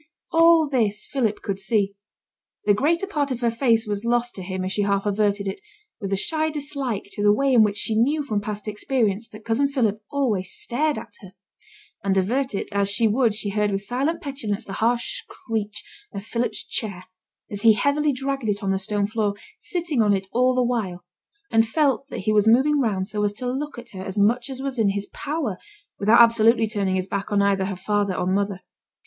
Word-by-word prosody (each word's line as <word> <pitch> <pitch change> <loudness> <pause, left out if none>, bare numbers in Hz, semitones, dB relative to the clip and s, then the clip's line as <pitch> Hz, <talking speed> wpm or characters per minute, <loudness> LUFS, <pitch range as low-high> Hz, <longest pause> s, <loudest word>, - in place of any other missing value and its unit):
All 330 -1 +5
this 220 -7 0
Philip 230 -6 -1
could 195 -1 -3
see; 200 -1 0 0.7
the 205 - +5
greater 325 - +1
part 295 -8 -1
of 255 -2 -3
her 235 -1 +2
face 230 -1 +2
was 205 0 -3
lost 240 +1 0
to 190 - -7
him 185 0 -4
as 185 - -3
she 205 - 0
half 200 0 0
averted 205 -1 0
it, 195 - -4 0.4
with 200 -3 -5
a - - +2
shy 315 +9 +1
dislike 280 -7 -4
to - - -4
the 205 0 +5
way 270 +5 +2
in 235 - +7
which 210 -1 +2
she 220 - +1
knew 285 +7 +2
from 215 -7 -2
past 210 0 -5
experience 215 -1 -1
that 215 0 -13
cousin 230 +5 +2
Philip 225 -7 0
always 230 -11 0
stared 295 +5 +1
at - - -9
her. 190 -2 -13 0.7
And 195 -1 +1
avert 245 +6 0
it - - -3
as 200 -1 +1
she 225 +3 +4
would 225 0 +2
she 210 -1 -1
heard 210 +1 +1
with 195 0 -2
silent 270 +10 -1
petulance 235 -7 -3
the 195 - -7
harsh 235 +1 0
screech 215 -3 -5 0.3
of 200 0 -7
Philip's 235 +1 -2
chair 195 -5 -4 0.5
as 205 -1 -4
he 225 -1 +7
heavily 285 +6 +1
dragged 270 -3 -2
it 205 0 -1
on 195 - 0
the 190 - 0
stone 205 +1 -1
floor, 210 -1 -1 0.2
sitting 335 - -1
on 205 -2 +3
it 190 0 -2
all 255 +1 +3
the 255 - +3
while, 200 -8 -2 0.5
and 225 0 +4
felt 275 -2 +1
that 280 - -6
he 215 +3 +1
was 210 0 +3
moving 270 +6 +4
round 200 -7 0
so 210 -1 -2
as 205 0 0
to 250 - -6
look 270 +4 -3
at 240 0 -9
her 190 - -8
as 190 +1 -5
much 235 +6 +2
as 265 0 -6
was 270 -3 -3
in 215 -3 +3
his 200 0 -1
power, 285 - -3 0.4
without 220 +4 +6
absolutely 230 0 +5
turning 200 -3 -1
his 185 -1 -1
back 200 +1 -4
on 205 - +2
either 195 -1 +2
her 195 0 -3
father 200 +1 -1
or 180 - -1
mother. 195 0 -1
220 Hz, 215 wpm, -23 LUFS, 200-260 Hz, 0.7 s, in